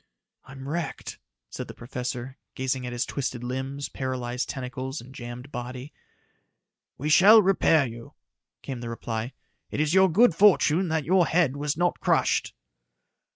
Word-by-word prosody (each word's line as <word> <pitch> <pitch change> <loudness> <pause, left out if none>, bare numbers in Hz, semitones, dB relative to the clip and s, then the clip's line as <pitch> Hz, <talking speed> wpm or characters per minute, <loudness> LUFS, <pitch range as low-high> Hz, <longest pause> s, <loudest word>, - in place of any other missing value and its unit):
"I'm 135 0 -10
wrecked," 170 +3 -4 0.3
said - - -6
the - - -10
professor, 125 +1 -6 0.2
gazing 130 -1 -2
at - - -5
his 120 0 -1
twisted 130 -3 -4
limbs, 130 +3 -4
paralyzed 125 -2 -4
tentacles 130 +2 -5
and 130 +3 -12
jammed 120 +2 -8
body. 125 +3 -7 1.0
"We 145 - -4
shall 195 +8 +8
repair 170 -6 +3
you," 115 -1 -10 0.5
came 130 -3 -5
the 120 - -5
reply. 115 +1 -4 0.4
"It - - -4
is 155 +1 +1
your 190 0 +6
good 225 +3 +5
fortune 185 -2 +4
that 160 -3 -1
your 180 -1 +3
head 160 -6 +2
was 145 +1 -2
not 175 +1 +1
crushed." - - +1
135 Hz, 150 wpm, -26 LUFS, 125-160 Hz, 1.0 s, shall